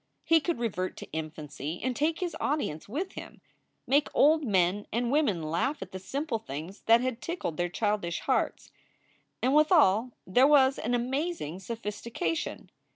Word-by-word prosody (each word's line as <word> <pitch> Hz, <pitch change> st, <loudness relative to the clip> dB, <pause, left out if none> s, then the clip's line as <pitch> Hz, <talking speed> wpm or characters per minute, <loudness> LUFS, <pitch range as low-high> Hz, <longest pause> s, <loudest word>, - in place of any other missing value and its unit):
He 330 Hz, 0 st, +5 dB
could 340 Hz, +2 st, -1 dB
revert 195 Hz, -6 st, -2 dB
to -, -, -10 dB
infancy 155 Hz, 0 st, -5 dB
and 255 Hz, 0 st, -1 dB
take 320 Hz, +5 st, 0 dB
his 345 Hz, -3 st, -2 dB
audience 270 Hz, -, -2 dB
with 350 Hz, -, -3 dB
him, -, -, -10 dB, 0.5 s
make 285 Hz, +2 st, +3 dB
old 310 Hz, +2 st, +5 dB
men 195 Hz, -3 st, +1 dB
and 235 Hz, +2 st, 0 dB
women 270 Hz, -, +2 dB
laugh 170 Hz, -, -1 dB
at -, -, -13 dB
the 190 Hz, -, -6 dB
simple 270 Hz, +4 st, -3 dB
things 165 Hz, +1 st, -7 dB
that 230 Hz, +1 st, +6 dB
had 255 Hz, -2 st, -2 dB
tickled 335 Hz, -, -4 dB
their 175 Hz, 0 st, 0 dB
childish 205 Hz, -3 st, -1 dB
hearts. -, -, -1 dB, 0.7 s
And 260 Hz, +2 st, +3 dB
withal 285 Hz, -, +4 dB
there 250 Hz, +9 st, +5 dB
was 275 Hz, -2 st, +5 dB
an 240 Hz, +2 st, 0 dB
amazing 255 Hz, -, -2 dB
sophistication. 230 Hz, -, -4 dB
235 Hz, 155 wpm, -29 LUFS, 185-290 Hz, 0.7 s, that